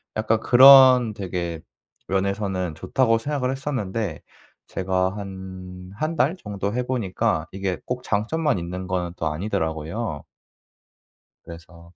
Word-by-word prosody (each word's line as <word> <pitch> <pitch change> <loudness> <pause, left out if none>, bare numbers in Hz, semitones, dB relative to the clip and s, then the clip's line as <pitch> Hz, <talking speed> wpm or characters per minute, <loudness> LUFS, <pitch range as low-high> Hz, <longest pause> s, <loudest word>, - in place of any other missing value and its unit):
약간 110 +1 +1
'그런 130 -1 +8
되게 90 -4 -4 0.5
면에서는 95 -2 -1
좋다.'고 115 - +1
생각을 130 +1 -2
했었는데 115 - -3 0.5
제가 95 0 -1
한 95 -2 -9
1 155 +9 -2
달 155 +5 +1
정도 100 - -4
해 125 +1 -1
보니까 120 -8 -1
이게 95 -1 -3
꼭 125 0 -4
장점만 135 +8 0
있는 90 +2 -5
거는 90 -2 -2
또 80 - -2
아니더라고요. 80 +1 -3 1.2
그래서 85 0 -13
100 Hz, 250 characters per minute, -23 LUFS, 90-125 Hz, 1.2 s, 그런